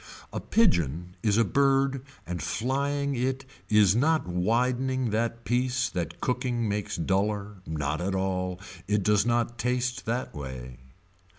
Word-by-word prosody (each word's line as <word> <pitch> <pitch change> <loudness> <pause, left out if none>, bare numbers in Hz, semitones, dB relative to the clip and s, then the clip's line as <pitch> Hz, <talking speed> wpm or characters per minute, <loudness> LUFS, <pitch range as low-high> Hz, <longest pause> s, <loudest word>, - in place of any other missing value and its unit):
A - - -2
pigeon 90 - +1
is 105 -2 +2
a 115 - +5
bird 135 +2 +2 0.2
and 90 0 -4
flying 140 - -1
it 130 +1 -1 0.2
is 105 -2 +5
not 155 +6 +3
widening 125 +7 +1
the 115 +2 0
piece 125 +1 +1
that 85 -1 -4
cooking 125 -2 -1
makes 105 0 -2
duller, 100 +4 0
not 75 0 -2
at 95 +2 -1
all, 90 -1 -1 0.3
it 105 0 +1
does 105 +2 +3
not 120 -1 0
taste 125 +1 -1
that 120 +3 -2
way. 65 -3 -7
115 Hz, 135 wpm, -27 LUFS, 90-125 Hz, 0.3 s, a